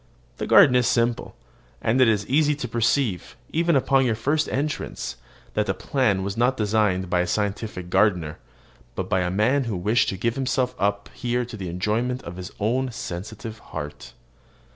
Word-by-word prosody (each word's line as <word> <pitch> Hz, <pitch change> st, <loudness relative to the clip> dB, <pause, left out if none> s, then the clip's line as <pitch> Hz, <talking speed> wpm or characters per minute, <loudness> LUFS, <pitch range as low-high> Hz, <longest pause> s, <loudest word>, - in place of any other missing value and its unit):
The -, -, -3 dB
garden 130 Hz, -, +7 dB
is 125 Hz, -1 st, +3 dB
simple; 120 Hz, -1 st, 0 dB, 0.4 s
and 120 Hz, +4 st, +2 dB
it 130 Hz, -, +6 dB
is 105 Hz, -2 st, +2 dB
easy 150 Hz, +4 st, +2 dB
to 130 Hz, -3 st, -4 dB
perceive, 115 Hz, -3 st, 0 dB, 0.2 s
even 170 Hz, 0 st, +2 dB
upon 135 Hz, 0 st, +3 dB
your 120 Hz, -3 st, +1 dB
first 145 Hz, +7 st, 0 dB
entrance, 145 Hz, -, -3 dB, 0.4 s
that -, -, 0 dB
the -, -, 0 dB
plan 110 Hz, -9 st, 0 dB
was 100 Hz, +1 st, -3 dB
not 125 Hz, +3 st, +2 dB
designed 105 Hz, -3 st, +1 dB
by 90 Hz, 0 st, +1 dB
a 90 Hz, -, +1 dB
scientific 100 Hz, -2 st, -3 dB
gardener, 90 Hz, -6 st, +2 dB, 0.6 s
but 95 Hz, -, -3 dB
by 95 Hz, -1 st, +1 dB
a 90 Hz, 0 st, 0 dB
man 120 Hz, +9 st, +2 dB
who 110 Hz, -5 st, -2 dB
wished 110 Hz, +5 st, +2 dB
to 95 Hz, -, -3 dB
give 115 Hz, +4 st, 0 dB
himself 130 Hz, -1 st, 0 dB
up 100 Hz, 0 st, -1 dB
here 125 Hz, -1 st, -1 dB
to 120 Hz, -, -9 dB
the 95 Hz, -4 st, -5 dB
enjoyment 110 Hz, +8 st, -1 dB
of 85 Hz, +1 st, -8 dB
his 90 Hz, +1 st, -7 dB
own 125 Hz, +5 st, 0 dB
sensitive 110 Hz, +1 st, -6 dB
heart. 75 Hz, -7 st, -8 dB
110 Hz, 180 wpm, -24 LUFS, 95-125 Hz, 0.6 s, garden